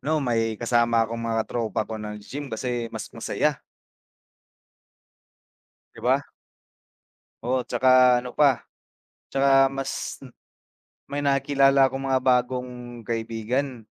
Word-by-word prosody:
ano 155 - -3
may 115 -2 0
kasama 115 -1 +2
akong 115 +1 -5
mga 115 -1 0
tropa 110 -3 -2
ko 110 0 -6
nag-gi-gym 105 +7 -7
kasi 120 0 -3
mas 110 -1 -8
masaya. 140 +5 -1 2.3
'Di - - -13
ba. - - +3 1.3
Oo 130 +1 +1
'tsaka 125 0 +4
ano 125 0 -5
pa, 140 -5 +3 0.7
'tsaka 135 0 +4
mas 135 0 -4 0.9
may 145 - -1
nakikilala 135 -1 +3
akong 135 0 -4
mga 130 -1 +2
bagong 125 0 +1 0.3
kaibigan, 115 +3 -3
125 Hz, 105 wpm, -25 LUFS, 115-135 Hz, 2.3 s, tsaka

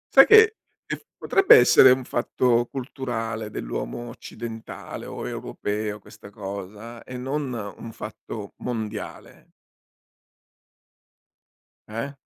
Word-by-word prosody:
Sai - - +10
che 445 0 +7 0.3
che - - -3
f - - -24
potrebbe 390 0 +6
essere 125 +1 +8
un 130 +1 +4
fatto 120 0 +1
culturale 120 -5 -4
dell'uomo 120 - -5
occidentale, 115 -1 -8
o - - -6
europeo 105 0 -3
questa 100 0 -14
cosa, 105 +3 -8
e 125 - -8
non 135 +2 -3 0.3
un 115 - -8
fatto 105 -1 -8
mondiale. 110 -3 -6 2.4
Eh? 115 +6 -4
115 Hz, 105 wpm, -25 LUFS, 105-130 Hz, 2.4 s, Sai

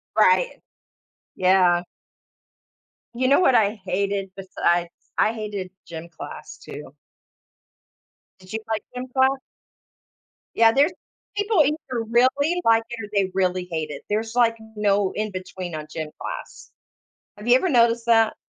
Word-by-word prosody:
Right, - - +3 0.7
yeah. 180 -2 +4 1.3
You 255 +2 0
know 280 - +5
what 265 -8 +4
I 210 -1 +2
hated 195 0 -1
besides 175 -3 0 0.3
I 220 - +3
hated 205 -4 -5
gym 170 0 -8
class 170 - -9
too. - - -10 1.4
Did 185 +1 -15
you 220 - -1
like 220 -1 -1
gym 250 +1 -5
class? 265 +1 +4 1.2
Yeah, 225 0 +6
there's 290 +8 +3 0.4
people 410 -5 +3
either 275 -5 -2
really 285 +8 +3
like 225 0 +4
it, 235 -3 -6
or 205 - -13
they 195 -2 +2
really 185 -1 0
hate 160 -2 -3
it. - - -8
There's, 220 +2 -1
like, 235 -2 +4 0.2
no 205 -2 +2
in 215 -1 -2
between 185 -2 -6
on 155 -1 -5
gym 155 -1 -4
class. - - -7 0.7
Have 210 +3 -8
you 245 - +7
ever 365 - +1
noticed 235 -3 +3
that? 225 -1 +4
215 Hz, 140 wpm, -23 LUFS, 185-245 Hz, 1.4 s, you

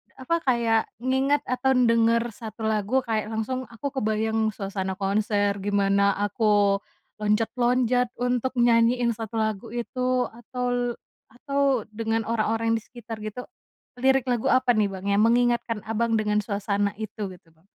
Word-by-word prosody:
apa, 265 +6 -1
kayak, 230 -3 +3 0.2
ngingat 270 +2 +2
atau 255 +1 0
denger 230 -1 +4
1 220 +1 -9
lagu 220 +4 +1
kayak 220 -3 -1
langsung 255 +4 -3
aku 235 +5 -6
kebayang 220 0 0
suasana 195 -1 -3
konser, 205 +1 +1
gimana 200 0 +2
aku 205 -1 +2 0.4
loncat-loncat 240 +3 +1
untuk 245 +1 -1
nyanyiin 235 0 +3
1 225 0 -7
lagu 220 -3 -1
itu 250 +1 0
atol 245 +1 -2 0.4
atau 275 -2 0
dengan 225 +1 -1
orang-orang 225 0 +1
di 225 - -2
sekitar 230 -2 -9
gitu, 215 +4 -5 0.6
lirik 265 -1 +3
lagu 245 +1 0
apa 255 -1 +4
nih, 210 -2 +2
Bang? 190 0 -7
Yang 200 +2 +3
mengingatkan, 240 -2 +1
Abang, 225 +1 0
dengan 210 0 +1
suasana 200 -1 -1
itu, 210 -1 -4
gitu, 175 -2 -16
Bang? 165 +5 -31
225 Hz, 140 wpm, -25 LUFS, 210-245 Hz, 0.6 s, denger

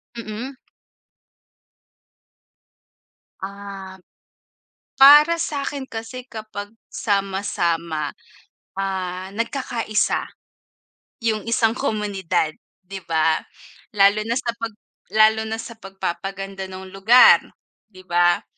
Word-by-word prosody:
Mm. 235 +4 -6 2.9
Um, 195 -1 -8 1.0
para 300 +5 +8
sa'kin 280 -3 -3
kasi 230 +3 -7
kapag 215 -2 -7 0.2
sama-sama, 170 -6 -1 0.7
ah, 190 -1 -3
nagkakaisa 230 -2 -1 0.9
'yung 220 -1 -1
isang 225 -1 +2
komunidad, 205 - -1 0.3
'di 195 +1 -8
ba? 160 -1 +2 0.6
Lalo 200 +1 +5
na 235 - 0
sa 240 -2 -1
'pag 230 -2 -6 0.4
lalo 220 0 +5
na 220 - -2
sa 230 -2 -11
pagpapaganda 195 0 -5
ng 190 0 -9
lugar, 215 +6 +7 0.5
'di 185 -4 -16
ba? 175 -1 +2
205 Hz, 85 wpm, -22 LUFS, 190-230 Hz, 2.9 s, para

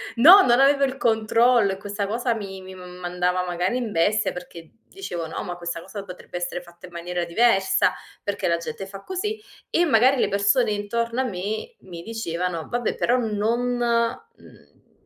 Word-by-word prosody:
No, 360 +11 +9
non 245 +2 +4
avevo 280 0 +5
il 265 0 -3
controllo, 230 -2 +3
e - - -7
questa 200 0 -4
cosa 235 +2 0
mi 195 -3 -7
mi 190 0 -10
m 180 -1 -11
mandava 180 +1 0
magari 180 +6 -1
in 235 -4 -3
bestia 205 +6 +2
perché 170 -2 -10 0.2
dicevo: 175 - -6
"No. - - -5
Ma 175 0 -6
questa 170 -1 -4
cosa 195 +2 -8
potrebbe 180 -1 -8
essere 175 0 -3
fatta 175 +1 -15
in 175 - -15
maniera 175 0 -3
diversa. 195 +1 +3 0.3
Perché 200 -3 -2
la 170 - +2
gente 180 +3 -6
fa 195 0 -10
così?" 420 +3 -3 0.3
E 345 - +2
magari 255 0 +4
le - - +2
persone 205 +3 +2
intorno 230 +4 -2
a - - +2
me 215 - -4
mi 170 -2 -10
dicevano: 180 -6 -4
"Vabbè, 240 -1 -1
però 245 +2 +2
non, 225 +1 0 0.2
mhmm, 240 - -4
205 Hz, 180 wpm, -23 LUFS, 180-240 Hz, 0.3 s, No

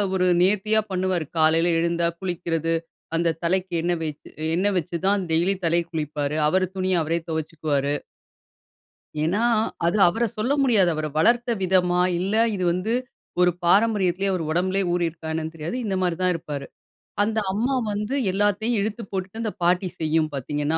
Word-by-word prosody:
ஒரு 185 0 +2
நேர்த்தியா 210 +3 +3
பண்ணுவாரு 185 -3 0
காலையில 165 +2 +4
எழுந்தா 170 0 +1
குளிக்கறது, 165 -3 -2 0.4
அந்த 165 -1 +1
தலைக்கு 185 +1 0
எண்ணெ 175 +1 +1
வச்சு 150 -2 -6 0.3
எண்ணெ 195 +4 +2
வச்சுதான் 180 +4 0
டெய்லி 175 +5 +2
தலைக்கு 170 +1 +1
குளிப்பாரு, 150 -1 -2
அவரு 185 +2 +2
துணிய 185 0 +1
அவரே 165 +2 0
தொவச்சிக்குவாரு. 150 -3 -1 1.3
ஏன்னா, 195 +8 +1 0.4
அது 175 +5 +1
அவர 225 +7 0
சொல்ல 220 +6 0
முடியாது. 210 -9 +4
அவர 155 0 -2
வளர்த்த 240 +8 +3
விதமா 180 -1 +2 0.2
இல்ல 195 +4 -1 0.2
இது 185 -2 -2
வந்து 185 +6 -2 0.5
ஒரு 180 - +5
பாரம்பரியத்துலேயே 195 -1 +3
அவர் 180 -3 -1
உடம்புலேயே 185 +4 +1
ஊறி 175 -1 +1
இருக்கா 160 -1 -8
என்னன்னு 160 0 -3
தெரியாது. 165 +8 -4
இந்த 195 -2 -1
மாரி 175 -2 0
தான் 185 0 +3
இருப்பாரு. 145 -4 -5 0.6
அந்த 220 +1 0
அம்மா 235 +7 0 0.2
வந்து 210 +4 -3 0.2
எல்லாத்தையும் 205 +4 +1
இழுத்து 215 +3 -2
போட்டுட்டு 195 +3 -4
அந்த 220 -2 -2
பாட்டி 180 +2 +2
செய்யும் 160 -1 +1
பாத்தீங்கன்னா 145 +3 -1
180 Hz, 150 wpm, -24 LUFS, 165-195 Hz, 1.3 s, ஒரு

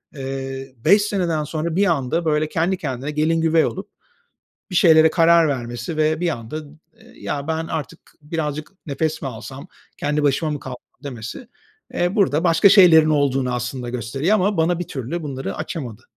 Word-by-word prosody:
Eee, 135 -1 -6
5 205 +1 +6
seneden 180 -7 -1
sonra 160 +2 -3
bir 200 +2 +3
anda, 165 0 0
böyle, 155 0 +1
kendi 170 +4 0
kendine 140 -3 -4
gelin 160 +2 +1
güvey 165 0 +3
olup - - -5 0.8
bir 180 - -6
şeylere 160 -2 +6
karar 165 -1 +4
vermesi 120 +2 -4
ve 155 +1 +1
bir 175 - 0
anda, 115 -1 -5
ımm, 155 0 -10 0.2
ııı, - - -18
“Ya 145 +1 -5
ben 160 0 -2
artık 160 0 -5 0.2
birazcık 150 0 -4
nefes 155 +3 -2
mi 140 - -2
alsam? 135 +7 -9 0.3
Kendi 150 +1 -1
başıma 145 +2 +1
mı 145 -2 -4
kal” 130 -1 -7 0.3
demesi, 125 - -7 0.5
eee, 175 +4 0
burada 170 -6 +2
başka 170 +3 +5
şeylerin 160 -6 +7
olduğunu 135 -3 +1
aslında 120 +1 -4
gösteriyor 125 - -1
ama 205 0 +1
bana 165 +1 +1
bir 175 - -5
türlü 140 +6 -4
bunları 135 -3 -5
açamadı. 120 - -6
155 Hz, 170 wpm, -21 LUFS, 135-165 Hz, 0.8 s, şeylerin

